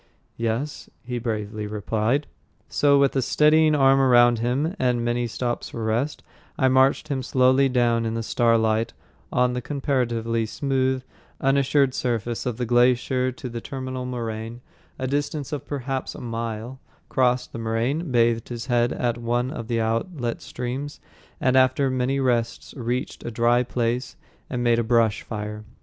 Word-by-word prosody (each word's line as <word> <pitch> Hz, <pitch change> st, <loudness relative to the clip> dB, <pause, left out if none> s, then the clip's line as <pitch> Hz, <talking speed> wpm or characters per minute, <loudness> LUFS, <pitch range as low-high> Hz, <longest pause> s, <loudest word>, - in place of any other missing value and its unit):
"Yes," 115 Hz, +6 st, -3 dB
he 125 Hz, 0 st, -4 dB
bravely 105 Hz, -2 st, -3 dB
replied. 110 Hz, +6 st, 0 dB, 0.4 s
So, 140 Hz, -1 st, +3 dB
with 140 Hz, -1 st, +3 dB
a 135 Hz, -, +2 dB
steadying 155 Hz, +3 st, +4 dB
arm 135 Hz, -1 st, +5 dB
around 120 Hz, -3 st, +5 dB
him 135 Hz, -, 0 dB
and 125 Hz, -2 st, +1 dB
many 120 Hz, 0 st, 0 dB
stops 120 Hz, +1 st, -3 dB
for 115 Hz, -, -5 dB
rest, 115 Hz, +7 st, -1 dB, 0.3 s
I 130 Hz, -2 st, +3 dB
marched 130 Hz, +3 st, +3 dB
him 135 Hz, -2 st, -1 dB
slowly 130 Hz, +1 st, +3 dB
down 120 Hz, -2 st, +2 dB
in 110 Hz, -, -2 dB
the 115 Hz, -, -2 dB
starlight 115 Hz, -1 st, +2 dB, 0.4 s
on 125 Hz, 0 st, +2 dB
the 125 Hz, -, -2 dB
comparatively 120 Hz, -5 st, -1 dB
smooth, 130 Hz, +1 st, 0 dB, 0.4 s
unassured 135 Hz, 0 st, +2 dB
surface 120 Hz, -1 st, -2 dB
of 120 Hz, -3 st, -2 dB
the 125 Hz, -, -2 dB
little 120 Hz, 0 st, -1 dB
glacier 125 Hz, +1 st, +3 dB
to 130 Hz, +1 st, -8 dB
the 120 Hz, -1 st, -6 dB
terminal 130 Hz, -1 st, -5 dB
moraine, 115 Hz, -1 st, -5 dB, 0.4 s
a 130 Hz, -, -3 dB
distance 145 Hz, +1 st, -2 dB
of 145 Hz, -1 st, -5 dB
perhaps 135 Hz, -2 st, -3 dB
a -, -, -8 dB
mile, 115 Hz, +1 st, -5 dB, 0.3 s
crossed 125 Hz, -1 st, +1 dB
the -, -, -5 dB
moraine, 120 Hz, +9 st, -1 dB
bathed 115 Hz, -1 st, +2 dB
his 120 Hz, -1 st, -5 dB
head 120 Hz, -2 st, +2 dB
at 120 Hz, -1 st, -1 dB
one 120 Hz, +2 st, -1 dB
of 115 Hz, -4 st, -6 dB
the 115 Hz, -1 st, 0 dB
outlet 115 Hz, +3 st, -2 dB
streams, 130 Hz, +4 st, -5 dB, 0.4 s
and 130 Hz, -1 st, +2 dB
after 130 Hz, +1 st, +3 dB
many 130 Hz, +2 st, 0 dB
rests 120 Hz, -3 st, -1 dB
reached 125 Hz, -1 st, -3 dB
a -, -, -4 dB
dry 120 Hz, +1 st, +3 dB
place 125 Hz, 0 st, -2 dB, 0.3 s
and 125 Hz, -1 st, -2 dB
made 120 Hz, -1 st, +3 dB
a -, -, +1 dB
brush 115 Hz, -2 st, +2 dB
fire. 105 Hz, -1 st, -6 dB
125 Hz, 160 wpm, -24 LUFS, 115-130 Hz, 0.4 s, arm